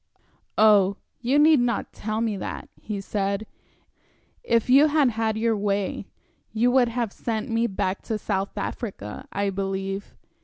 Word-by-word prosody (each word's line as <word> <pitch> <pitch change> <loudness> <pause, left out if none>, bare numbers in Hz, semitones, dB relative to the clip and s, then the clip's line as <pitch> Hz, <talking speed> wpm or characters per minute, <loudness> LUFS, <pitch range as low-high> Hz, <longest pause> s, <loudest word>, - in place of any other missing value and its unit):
"Oh, 205 -2 +5 0.2
you 255 +3 +1
need 305 0 +6
not 240 -3 -1
tell 215 +1 -3
me 225 -3 0
that," - - -6
he 210 -2 -4
said. 200 +1 -2 1.0
"If 230 - +2
you 275 +4 +7
had 295 -4 +3
had 220 -1 -1
your 225 0 +1
way, 200 -1 -1 0.4
you 235 +3 +2
would 250 -1 +4
have 235 -3 -2
sent 230 +1 -3
me 230 +1 +2
back 190 -2 -2
to 220 - -1
South 200 -1 -3
Africa, 195 - -5
I 200 0 -1
believe." 195 +1 -4
215 Hz, 150 wpm, -25 LUFS, 200-235 Hz, 1.0 s, you